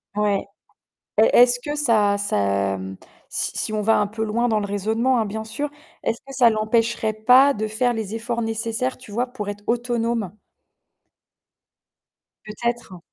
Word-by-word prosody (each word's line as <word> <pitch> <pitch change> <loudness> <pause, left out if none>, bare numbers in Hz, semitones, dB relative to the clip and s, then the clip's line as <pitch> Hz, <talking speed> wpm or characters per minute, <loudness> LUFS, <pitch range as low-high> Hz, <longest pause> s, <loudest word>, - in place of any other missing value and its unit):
Ouais. 205 -1 +1 0.8
Et 220 - +7
est-ce 245 0 +6
que 295 +4 -4
ça 215 -8 +2
ça, 100 - 0
mmh 95 0 -7 0.4
si - - -2
si - - -2
on 215 - -1
va 225 +2 +3
un 205 - 0
peu 220 +1 -3
loin 235 +3 0
dans 220 -2 +2
le 205 - -2
raisonnement 220 +6 0
hein, - - +1
bien 220 +2 -5
sûr, 285 +7 -4 0.3
est-ce 230 - -1
que 275 - -9
ça 250 -3 +5
l'empêcherait 220 0 0
pas 250 +6 +5
de 215 +1 -3
faire 240 +3 +1
les 220 -2 -4
efforts 235 +1 -3
nécessaires, 225 +3 -2
tu 235 -5 -13
vois, 245 +4 -1
pour 245 -5 -6
être 205 0 -6
autonome? 235 -4 -1 2.1
Peut-être. 235 -3 -4
225 Hz, 165 wpm, -22 LUFS, 210-240 Hz, 2.1 s, Et